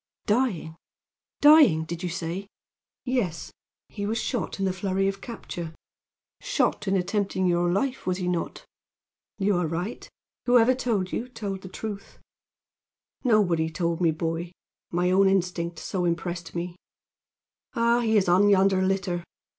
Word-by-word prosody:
"Dying! 205 -9 0 0.6
dying, 290 - +7
did 165 +1 -6
you 180 - -2
say?" 175 +3 -4 0.6
"Yes. 235 -11 -1 0.4
He 205 -1 -5
was 225 +2 -1
shot 245 0 -2
in 195 - -1
the 190 - 0
flurry 195 0 0
of 195 0 -3
capture." 175 -8 -7 0.6
"Shot 210 - 0
in 195 0 +2
attempting 190 0 0
your 175 0 +2
life, 255 +7 -1
was 180 -1 +1
he 180 -2 -3
not?" 175 -2 -3 0.7
"You 195 -2 +2
are 175 -2 0
right. 175 +8 -4 0.4
Whoever 245 0 +6
told 225 -8 -1
you, 245 - -3
told 205 -5 -5
the 185 - -9
truth." 205 +1 -7 1.1
"Nobody 185 - +3
told 170 +1 -2
me, 170 - +4
boy. 165 +2 -3 0.4
My 180 +1 +1
own 195 +1 +5
instinct 175 -3 0
so 180 0 -2
impressed 175 0 -3
me. 175 0 -3 1.0
Ah, 235 0 +3
he 220 -2 +2
is 195 - +2
on 185 +4 +5
yonder 195 -1 +4
litter! 185 -2 -1
190 Hz, 145 wpm, -26 LUFS, 175-210 Hz, 1.1 s, dying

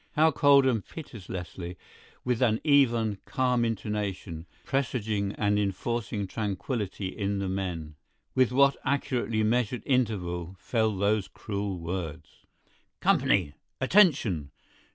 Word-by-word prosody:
How 160 +1 +4
coldly 140 -2 +5
and 110 -5 -1
pitilessly—with 95 - -7
what 125 - +5
an 110 - 0
even, 120 -8 +3
calm 125 -2 +1
intonation, 100 -6 -3 0.2
presaging, 110 -7 -1
and 105 0 +1
enforcing 105 +1 -2
tranquility 100 0 -3
in 100 +1 -2
the 100 -1 -2
men—with 95 - -2
what 140 +2 +4
accurately 120 -5 0
measured 120 0 +1
interval 95 -9 -1
fell 110 0 0
those 100 0 +1
cruel 100 -2 -4
words: 85 -3 -5 0.7
"Company!… 85 -7 +2 0.3
Attention! 130 - +3
105 Hz, 105 wpm, -28 LUFS, 95-125 Hz, 0.7 s, coldly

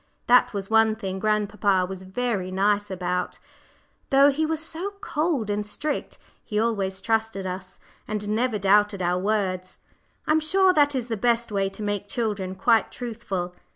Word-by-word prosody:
That 245 +1 +5
was 200 -3 -4
one 220 0 +4
thing 190 -3 -5
grandpapa 210 -2 +1
was 190 0 -7
very 190 -1 -2
nice 205 +2 +1
about; 180 -1 -2 0.7
though 275 +1 +6
he 310 +3 0
was 320 -1 -1
so 335 +5 -4
cold 300 - -1
and 205 0 -1
strict, 290 +8 -4 0.3
he 210 - -2
always 200 -4 -1
trusted 220 -3 -1
us, 185 0 -6 0.3
and 210 -1 -3
never 220 +2 0
doubted 200 0 +3
our 175 +1 +1
words. 185 -2 -1 0.5
I'm 310 +1 +3
sure 370 +4 +4
that 290 -3 +3
is 245 -2 -2
the 225 -2 -2
best 235 +1 +1
way 195 -1 0
to 205 +2 -7
make 205 -1 -2
children 200 -4 -2
quite 225 +4 +2
truthful. 205 -7 -4
210 Hz, 160 wpm, -25 LUFS, 190-240 Hz, 0.7 s, though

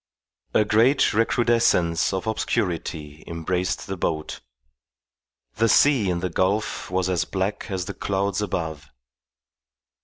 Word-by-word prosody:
A 105 - +4
great 115 +7 +3
recrudescence 115 -7 +2
of 95 -1 -3
obscurity 80 -8 -2
embraced 90 +2 -2
the 95 - -4
boat. 80 -3 -3 1.2
The 115 +1 +3
sea 130 -8 +4
in 85 -1 -1
the 90 - -1
gulf 95 +5 -1
was 90 0 0
as 90 -4 +1
black 95 +2 -3
as 95 -2 -3
the - - -5
clouds 100 0 -1
above. 80 -7 -4
95 Hz, 120 wpm, -24 LUFS, 85-105 Hz, 1.2 s, A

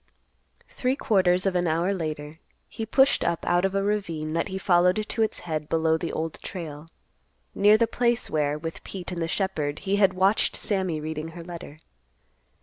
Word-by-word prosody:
Three 255 +1 -1
quarters 185 -7 +2
of 190 -2 +1
an 175 -1 +1
hour 170 +5 +1
later, 155 -3 -5 0.3
he 225 - -6
pushed 270 +5 +4
up 170 - -1
out 175 +2 +2
of 195 0 -1
a 195 - +1
ravine 170 -7 -2
that 165 +4 0
he 190 -1 -4
followed 180 -1 +3
to 225 - -2
its 220 - 0
head 155 -3 -4
below 160 0 +2
the 165 +1 -3
Old 160 0 -4
Trail, 155 -4 -7 0.7
near 210 +2 +5
the 230 - +3
place 240 +1 +1
where, 150 -1 0
with 165 +1 -6
Pete 185 -2 -7
and 175 -1 -4
the 165 - 0
shepherd, 160 -6 -1
he 195 +1 +1
had 195 -2 +4
watched 195 +3 +2
Sammy 190 -6 -1
reading 155 +1 -4
her 165 +1 -9
letter. 170 -3 -9
175 Hz, 185 wpm, -26 LUFS, 160-195 Hz, 0.7 s, near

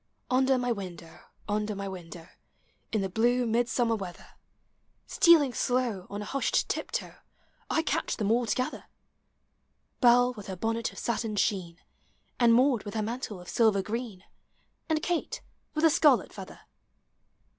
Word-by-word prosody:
Under 260 +1 +3
my 245 -1 -1
window, 180 -6 -7 0.2
under 210 0 -1
my 200 0 -4
window. 175 -3 -9 0.6
In 215 - 0
the 195 - -1
blue 240 +5 +1
Midsummer 235 0 +1
weather, 190 -4 -8 0.8
Stealing 320 - +5
slow, 240 -8 -1
on 205 +1 -5
a - - -8
hushed 275 +3 0
tiptoe, - - -4 0.5
I 320 - +1
catch - - -1
them 210 -2 0
all 235 +1 +2
together: 255 +4 -2 0.6
— - - -46
liell 245 0 +5
with 210 -3 -10
her 190 - -5
bonnet 225 +4 -2
of - - -16
satin 225 -2 -2
sheen. 185 -5 -1 0.6
And 240 -1 +5
Maud 250 0 +4
with 205 +1 -7
her 215 - 0
mantle 225 -3 -5
of 180 - -13
silver 215 -4 +2
green, 215 -3 -5 0.7
And 310 -1 0
Kate 350 +8 -2 0.3
with 305 - -1
the 325 - +6
scarlet 290 -4 +3
feather. - - -10
230 Hz, 150 wpm, -28 LUFS, 200-250 Hz, 0.8 s, the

